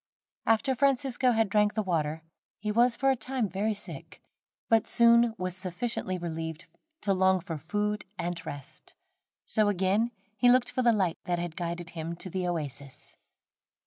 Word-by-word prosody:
After 225 Hz, +5 st, +3 dB
Francisco 265 Hz, -1 st, +2 dB
had 225 Hz, -2 st, +2 dB
drank 210 Hz, +1 st, +2 dB
the 215 Hz, -, 0 dB
water, 160 Hz, -3 st, -1 dB, 0.3 s
he 210 Hz, +1 st, -2 dB
was 235 Hz, +2 st, +4 dB
for 270 Hz, 0 st, +3 dB
a -, -, +2 dB
time 255 Hz, -2 st, -2 dB
very 200 Hz, +4 st, -1 dB
sick, 205 Hz, -, -9 dB, 0.5 s
but 225 Hz, -1 st, +3 dB
soon 235 Hz, -1 st, +5 dB
was 185 Hz, -1 st, -3 dB
sufficiently 185 Hz, +1 st, -3 dB
relieved 160 Hz, -2 st, -5 dB, 0.4 s
to 200 Hz, -2 st, +2 dB
long 190 Hz, 0 st, +3 dB
for 165 Hz, -2 st, -6 dB
food 210 Hz, +5 st, -2 dB
and 175 Hz, -1 st, -3 dB
rest, 145 Hz, -4 st, -9 dB, 0.5 s
so 215 Hz, -1 st, +2 dB
again 200 Hz, +4 st, +2 dB, 0.3 s
he 245 Hz, -, +5 dB
looked 245 Hz, 0 st, +4 dB
for 255 Hz, -, 0 dB
the 240 Hz, -1 st, +5 dB
light 190 Hz, -6 st, 0 dB
that 175 Hz, -1 st, 0 dB
had 170 Hz, -1 st, -4 dB
guided 170 Hz, -1 st, -4 dB
him 165 Hz, 0 st, -5 dB
to 185 Hz, +2 st, -6 dB
the 185 Hz, 0 st, -1 dB
oasis. 140 Hz, -5 st, -5 dB
195 Hz, 165 wpm, -29 LUFS, 170-230 Hz, 0.5 s, soon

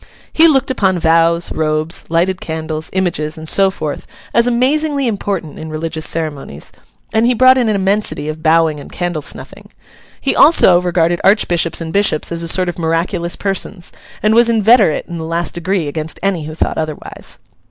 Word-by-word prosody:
He 325 Hz, +1 st, +6 dB
looked 270 Hz, -3 st, +2 dB
upon 190 Hz, -7 st, +1 dB
vows, 165 Hz, +1 st, +2 dB
robes, 155 Hz, +1 st, -2 dB
lighted 180 Hz, +3 st, 0 dB
candles, 160 Hz, -1 st, -4 dB
images, 170 Hz, -5 st, -2 dB
and 160 Hz, 0 st, -8 dB
so 195 Hz, +3 st, +4 dB
forth, 155 Hz, -6 st, -6 dB, 0.3 s
as 235 Hz, +1 st, +3 dB
amazingly 280 Hz, +4 st, +1 dB
important 195 Hz, -, -3 dB
in 160 Hz, -, -7 dB
religious 160 Hz, 0 st, -2 dB
ceremonies; 145 Hz, -, -4 dB, 0.4 s
and 225 Hz, +1 st, +2 dB
he 250 Hz, -, +2 dB
brought 255 Hz, +2 st, +6 dB
in 245 Hz, -4 st, +1 dB
an 215 Hz, -, +1 dB
immensity 195 Hz, -6 st, -1 dB
of 155 Hz, 0 st, -5 dB
bowing 160 Hz, -1 st, +2 dB
and -, -, -12 dB
candle 175 Hz, -3 st, -3 dB
snuffing. -, -, -7 dB, 0.5 s
He -, -, -1 dB
also 185 Hz, -, +6 dB
regarded 175 Hz, -1 st, 0 dB
archbishops 175 Hz, -5 st, +2 dB
and 160 Hz, 0 st, -6 dB
bishops 200 Hz, -7 st, +1 dB
as 170 Hz, 0 st, -2 dB
a 170 Hz, -, -3 dB
sort 185 Hz, +2 st, +2 dB
of 175 Hz, -, -4 dB
miraculous 170 Hz, +1 st, -1 dB
persons, 195 Hz, -2 st, -3 dB, 0.3 s
and 215 Hz, +1 st, +3 dB
was 235 Hz, +1 st, +4 dB
inveterate 220 Hz, -5 st, +3 dB
in 170 Hz, -1 st, -7 dB
the -, -, -5 dB
last 165 Hz, +1 st, -2 dB
degree 175 Hz, -1 st, -2 dB
against 155 Hz, +2 st, -5 dB
any 185 Hz, -6 st, -1 dB
who 155 Hz, 0 st, -7 dB
thought -, -, -2 dB
otherwise. 155 Hz, -1 st, -7 dB
170 Hz, 175 wpm, -15 LUFS, 160-205 Hz, 0.5 s, He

